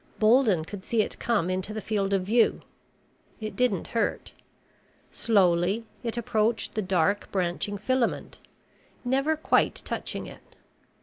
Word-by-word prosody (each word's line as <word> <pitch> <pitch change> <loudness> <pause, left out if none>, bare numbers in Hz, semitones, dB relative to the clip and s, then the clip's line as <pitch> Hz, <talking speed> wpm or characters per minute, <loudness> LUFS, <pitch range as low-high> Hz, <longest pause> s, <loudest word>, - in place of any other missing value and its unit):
Bolden 215 -7 +4
could 195 +1 -8
see 225 -1 +1
it - - -7
come 220 -7 +1
into 190 +3 -3
the - - -2
field 205 -2 -1
of 195 -2 +2
view. 225 +5 +2 0.8
It 215 -1 -5
didn't 250 -8 0
hurt. 230 - -1 0.8
Slowly 195 0 +2 0.2
it 235 -1 -4
approached 220 0 0
the 215 - -1
dark 190 +1 +1
branching 185 +2 -1
filament, 250 +4 -1 0.7
never 275 +5 +1
quite 315 - +1
touching - - -4
it. - - -14
215 Hz, 130 wpm, -27 LUFS, 190-235 Hz, 0.8 s, Bolden